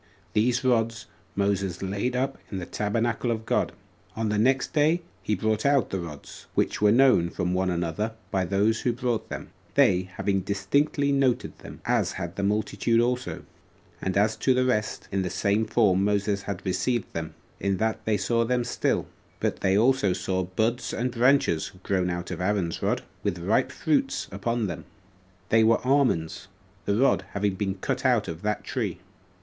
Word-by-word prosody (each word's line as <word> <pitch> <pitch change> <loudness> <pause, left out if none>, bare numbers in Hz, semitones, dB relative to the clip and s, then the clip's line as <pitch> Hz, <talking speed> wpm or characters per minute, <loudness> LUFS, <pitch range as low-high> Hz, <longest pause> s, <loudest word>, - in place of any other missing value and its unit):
These 120 +4 +2
rods 115 -3 +1 0.3
Moses 100 -2 0
laid 100 +6 -1
up 135 +2 -1
in 100 - -3
the 90 - -4
tabernacle 115 +5 -1
of 110 -1 -2
God. - - +1 0.4
On 110 -1 -1
the 105 0 +1
next 130 +6 +2
day 160 +3 +3 0.2
he 105 - 0
brought 110 +2 0
out 140 -5 +3
the 95 - -1
rods, 80 -5 -9
which - - 0
were 105 -1 +5
known 120 -8 +5
from 90 0 -2
one 95 0 +1
another 90 +5 -2 0.2
by 95 -1 +1
those 100 +5 +1
who 120 - +1
brought 120 -2 -2
them, - - -7 0.2
they 90 +1 +4
having 100 -1 0
distinctly 140 +10 +1
noted 135 -3 +1
them, - - -11
as - - +1
had 85 +2 -5
the - - -3
multitude 105 +3 +1
also; 125 +1 -1 0.6
and 95 +1 -1
as 105 +2 +3
to 130 +3 +2
the 130 0 +2
rest, 105 -5 -1
in 95 - 0
the 90 - -2
same 100 +5 +1
form 100 -4 +3
Moses 100 0 +1
had 100 0 -6
received 95 +5 -1
them, 80 -1 -5 0.2
in 100 -1 0
that 110 +1 -1
they 110 -1 +1
saw 115 +4 +1
them 125 +1 +1
still; 125 - 0 0.3
but - - -1
they 95 +1 +2
also 115 -4 +3
saw 95 +1 -1
buds 110 +7 -1
and 125 +2 -1
branches 120 - +2
grown 95 -2 0
out 85 +1 -4
of 90 - -4
Aaron's 90 -3 0
rod, - - 0 0.2
with 85 - -1
ripe 90 +6 +1
fruits 275 -2 0
upon 115 +4 -1
them; 85 -5 -5 0.6
they 110 0 +5
were 115 +1 +5
almonds, 125 - +1 0.4
the 100 - +1
rod 135 +5 +3
having 100 -1 0
been 95 0 -2
cut 95 - -3
out - - +3
of 80 +1 -6
that 105 0 -1
tree. - - -2
105 Hz, 180 wpm, -26 LUFS, 95-120 Hz, 0.6 s, were